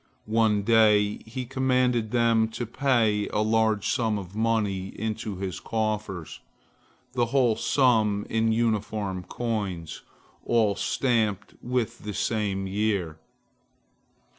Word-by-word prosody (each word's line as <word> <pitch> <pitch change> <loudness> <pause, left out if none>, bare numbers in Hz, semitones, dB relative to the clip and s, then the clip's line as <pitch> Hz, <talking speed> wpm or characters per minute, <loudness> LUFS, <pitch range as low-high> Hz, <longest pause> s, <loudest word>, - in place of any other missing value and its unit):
One 110 -2 +2
day 105 -2 +4
he 125 +3 -5
commanded 125 -3 +1
them 115 -1 +3
to 120 - -2
pay 115 -4 +1
a 105 - -1
large 110 -2 +1
sum 110 -3 +1
of 95 -1 -8
money 105 -4 0
into 110 -1 -3
his 95 -1 -4
coffers, 105 -6 -3 0.7
the 120 -2 +1
whole 125 -3 +2
sum 110 -7 +2
in 115 0 +1
uniform 105 -4 -1
coins, 100 -6 -4 0.4
all 110 -4 +2
stamped 110 -6 0
with 125 -3 -2
the 105 -1 -6
same 100 -2 -1
year. 95 -5 -1
110 Hz, 115 wpm, -26 LUFS, 100-115 Hz, 0.7 s, day